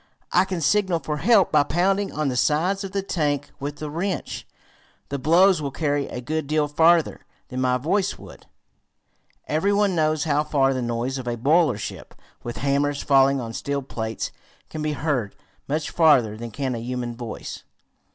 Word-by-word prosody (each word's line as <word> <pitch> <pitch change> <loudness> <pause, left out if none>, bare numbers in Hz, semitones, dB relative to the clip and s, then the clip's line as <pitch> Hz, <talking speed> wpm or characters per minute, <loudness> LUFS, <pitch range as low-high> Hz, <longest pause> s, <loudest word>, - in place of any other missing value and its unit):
I 180 +2 +4
can 185 -3 -4
signal 185 +2 +2
for 150 -2 -4
help 205 +4 +4
by 150 - +5
pounding 190 +7 +1
on 155 -1 -1
the 125 - -2
sides 175 +9 +1
of 195 - -6
the 195 0 -2
tank 145 -6 -1
with 145 +1 -4
the 150 +1 -6
wrench. 175 +6 -4 0.6
The 140 - -3
blows 175 +5 +4
will 140 - -2
carry 145 0 -1
a - - -6
good 155 +3 -3
deal 150 0 +1
farther 165 +2 +3 0.3
than 130 0 -3
my 125 -1 +2
voice 180 +9 0
would." - - -14 1.0
Every 160 +7 +1
one 205 -1 +2
knows 155 -2 +1
how 150 -1 +1
far 135 -3 +2
the 130 - -2
noise 120 +3 -2
of 125 - -7
a 120 0 -2
boiler 145 0 +3
shop, 105 - -7 0.3
with 120 - -6
hammers 140 0 0
falling 135 0 +4
on 115 -2 -5
steel 140 +2 -3
plates, 110 -4 -4 0.4
can 155 - -5
be 150 0 -1
heard; 140 -9 -2 0.3
much 150 +2 -2
farther 140 -10 +4
than 115 +2 -7
can 130 +3 -3
a 115 - -3
human 120 0 -4
voice. 115 -2 -7
145 Hz, 180 wpm, -23 LUFS, 130-165 Hz, 1.0 s, by